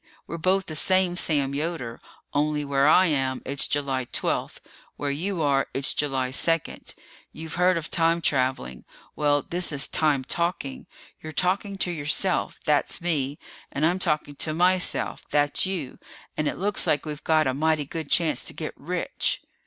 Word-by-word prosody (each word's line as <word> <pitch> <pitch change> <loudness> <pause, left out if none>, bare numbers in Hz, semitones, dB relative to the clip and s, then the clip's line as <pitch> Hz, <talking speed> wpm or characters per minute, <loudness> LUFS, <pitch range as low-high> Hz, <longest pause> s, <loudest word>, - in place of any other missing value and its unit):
We're 170 - -6
both 190 +3 +2
the 155 - -6
same 185 +2 +3
Sam 145 -6 +2
Yoder, 145 -6 -4 0.3
only 150 0 0
where 140 0 +2
I 185 +4 +6
am, 135 -5 0
it's 140 0 +2
July 135 -3 -1
twelfth. - - -2 0.4
Where 145 -1 -2
you 170 +4 -2
are, 140 -2 +2
it's 135 +1 +3
July 135 -3 -1
second. 165 +4 -1 0.4
You've 160 -1 -8
heard 180 0 +3
of 165 - -5
time 165 0 +3
traveling. 130 - -1 0.3
Well, 145 -1 +2
this 175 0 -1
is 140 -2 +1
time 150 -4 +1
talking. 170 - -3 0.3
You're 155 - -7
talking 195 +4 0
to 180 - +1
yourself 160 +4 0
that's 150 -3 +1
me 150 -5 -1 0.3
and 145 +2 0
I'm 175 +3 +1
talking 150 -4 0
to 155 +1 -2
myself 180 +2 +1
that's 145 +5 +2
you 170 -9 -4 0.4
and 155 - -1
it - - -2
looks 200 +2 0
like 145 0 +1
we've 150 -1 -6
got 155 -1 +3
a 130 - +1
mighty 155 +1 +1
good 155 +1 -6
chance 165 -2 +3
to - - 0
get - - -5
rich." - - -2
155 Hz, 170 wpm, -25 LUFS, 140-170 Hz, 0.4 s, I